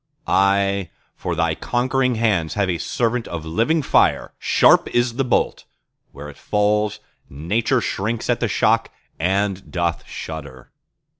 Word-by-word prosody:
Aye, 100 -1 +2 0.3
for 90 - -3
Thy 85 -1 +1
conquering 125 +6 0
hands 105 -8 0
have 100 -3 +1
a 85 - -3
servant 120 0 -1
of 80 -2 -6
living 115 - +1
fire— - - +2
Sharp - - +4
is 120 0 +1
the 135 - +2
bolt!—where 75 - -4
it 75 - -11
falls, 105 0 0 0.3
Nature 110 - 0
shrinks 110 +3 -2
at - - +1
the - - 0
shock - - +2 0.3
and 95 +3 -1
doth 85 -2 -1
shudder. 70 -6 -8
100 Hz, 135 wpm, -21 LUFS, 85-115 Hz, 0.3 s, Sharp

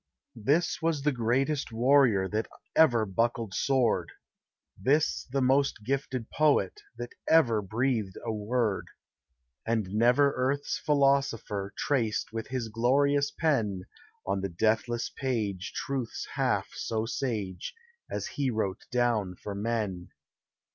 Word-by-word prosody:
This 155 +9 +2
was 160 -3 0
the 150 - +3
bravest 130 +4 0
warrior 120 -4 +4
That 110 +3 -2 0.3
ever 120 -9 +5
buckled 115 +1 -1
sword; 130 -1 +1 0.7
This 140 +10 +1
the 135 +1 0
most 135 -3 +2
gifted 130 -2 -2
poet 155 - +2 0.2
That - - -6 0.2
ever 120 -10 +5
breathed 110 -1 -1
a 115 - -1
word; 110 0 -1 0.8
And 110 -4 -1
never 125 +6 +4
earth's 135 +3 -1
philosopher 135 -8 +1
Traced 115 -6 0
with 115 -1 -4
his 125 -3 -3
glorious 140 +5 +2
pen 110 - 0 0.4
On 95 0 -1
the 100 - -2
deathless 110 +6 0
page 105 -8 -2
truths 130 -4 -4
half - - 0
so 110 -1 -2
sage 110 -7 -3 0.3
As - - -3
he 140 -3 -1
wrote 110 -4 -2
down 115 -7 +1
for 100 - -7
men. 100 -4 -2
120 Hz, 120 wpm, -29 LUFS, 105-135 Hz, 0.8 s, ever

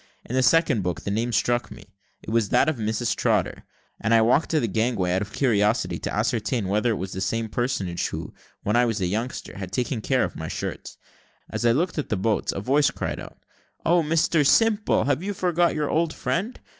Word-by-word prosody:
In - - -7
the 130 - +3
second 150 -4 +3
book 90 -3 -3
the 100 - -4
name 115 +4 -1
struck 120 +2 +1
me; 95 - -13 0.3
it - - -6
was 115 -3 +1
that 135 - +3
of 155 -4 0
Mrs 110 +1 -1
Trotter, - - 0 0.3
and 115 +2 +2
I 115 - +6
walked 125 +7 +3
to 160 - +2
the 120 - 0
gangway, 110 -4 0
out 95 - +1
of 105 0 -5
curiosity, 110 -3 +1
to - - -4
ascertain 110 0 -1
whether 105 +4 +1
it 115 - +1
was 95 -1 -5
the 95 - -4
same 115 +3 -1
personage 100 -7 -1
who, - - -6 0.3
when 105 - 0
I 120 +1 +4
was 115 -2 -1
a 95 - 0
youngster, 110 +2 -4
had 95 -2 -6
taken 125 +4 -1
such - - -9
care - - +3
of - - -3
my - - -5
shirts. - - -5 0.5
As 120 - 0
I - - +5
looked 165 +4 0
at 150 - -4
the 105 - 0
boats, 105 +3 0
a 95 - -4
voice 140 +7 +3
cried - - -4
out, - - -10 0.5
"Oh, 170 +1 +4
Mr 160 0 +2
Simple, 215 +7 +3
have 145 +2 0
you 200 +2 -3
forgot 175 -1 +1
your 150 -1 -1
old 160 0 0
friend? 210 +9 -2
120 Hz, 225 wpm, -24 LUFS, 105-150 Hz, 0.5 s, I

